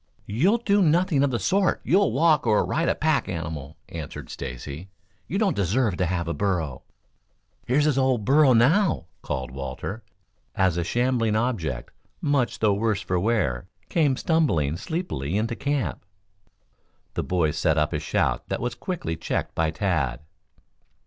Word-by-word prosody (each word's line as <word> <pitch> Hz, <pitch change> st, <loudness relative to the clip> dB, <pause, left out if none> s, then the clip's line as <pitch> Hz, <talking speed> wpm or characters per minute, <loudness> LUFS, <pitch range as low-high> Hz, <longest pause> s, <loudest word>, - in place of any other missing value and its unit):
"You'll 165 Hz, -, +2 dB
do 205 Hz, -4 st, +2 dB
nothing 170 Hz, -2 st, +3 dB
of 140 Hz, -, +3 dB
the 120 Hz, -, 0 dB
sort. 190 Hz, +8 st, +1 dB
You'll 195 Hz, -, +3 dB
walk, 150 Hz, +1 st, +3 dB
or 105 Hz, -2 st, +3 dB
ride 165 Hz, +2 st, 0 dB
a -, -, +2 dB
pack 155 Hz, -2 st, +1 dB
animal," 80 Hz, -3 st, -5 dB
answered 80 Hz, -4 st, -7 dB
Stacy. 70 Hz, +7 st, -7 dB, 0.4 s
"You 190 Hz, -, -2 dB
don't 205 Hz, -3 st, +2 dB
deserve 100 Hz, +2 st, +1 dB
to 90 Hz, -, +1 dB
have 85 Hz, -1 st, -2 dB
a 85 Hz, -, -1 dB
burro." 80 Hz, -6 st, -1 dB, 0.9 s
"Here's 145 Hz, +4 st, +3 dB
his 145 Hz, -3 st, +2 dB
old 130 Hz, -5 st, +1 dB
burro 140 Hz, 0 st, +5 dB
now," 155 Hz, -, +3 dB, 0.2 s
called 65 Hz, -3 st, -4 dB
Walter, 70 Hz, -, -5 dB, 0.5 s
as 95 Hz, -5 st, +2 dB
a 85 Hz, -, 0 dB
shambling 120 Hz, +1 st, +1 dB
object, 95 Hz, -, -2 dB, 0.3 s
much 140 Hz, -4 st, +1 dB
the 105 Hz, -2 st, +3 dB
worse 105 Hz, 0 st, 0 dB
for 90 Hz, -2 st, -1 dB
wear, 90 Hz, -, 0 dB, 0.2 s
came 145 Hz, -6 st, +2 dB
stumbling 85 Hz, -, +1 dB
sleepily 95 Hz, -, -3 dB
into 115 Hz, +2 st, -1 dB
camp. 140 Hz, -, -2 dB, 1.1 s
The -, -, -1 dB
boys 80 Hz, -4 st, 0 dB
set 80 Hz, -1 st, +1 dB
up 75 Hz, -1 st, +1 dB
a -, -, 0 dB
shout -, -, -1 dB
that -, -, -1 dB
was 120 Hz, 0 st, -2 dB
quickly 170 Hz, -, -4 dB
checked 80 Hz, -, -3 dB
by 80 Hz, -1 st, +1 dB
Tad. 80 Hz, -, -1 dB
110 Hz, 155 wpm, -25 LUFS, -, 1.1 s, burro